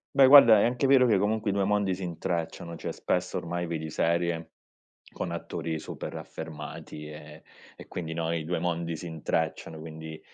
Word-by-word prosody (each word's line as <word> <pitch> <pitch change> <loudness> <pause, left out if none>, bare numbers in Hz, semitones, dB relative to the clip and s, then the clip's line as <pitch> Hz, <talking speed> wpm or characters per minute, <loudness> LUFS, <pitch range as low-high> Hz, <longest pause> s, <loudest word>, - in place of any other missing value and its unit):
Beh 135 -1 +8
guarda, 130 -6 +9
è - - +4
anche 125 +3 +1
vero 130 -1 +6
che 110 -5 +4
comunque 105 +2 0
i - - -1
2 100 -1 +1
mondi 100 -1 +1
si 95 +1 -5
intrecciano, 85 -1 -3
cioè - - -5
spesso 90 0 -1
ormai 85 +1 -3
vedi 80 -1 -4
serie, 85 0 0 0.6
con - - -4
attori 80 -1 -4
super - - -7
affermati 75 0 -8
e 75 0 -11 0.3
e - - -12
quindi, 80 -2 -5
no, 80 0 -1
i 80 -2 -2
due 90 +1 -1
mondi 85 -1 -2
si 80 - -8
intrecciano, 80 0 -2
quindi, 80 0 -8
85 Hz, 180 wpm, -28 LUFS, 80-100 Hz, 0.6 s, guarda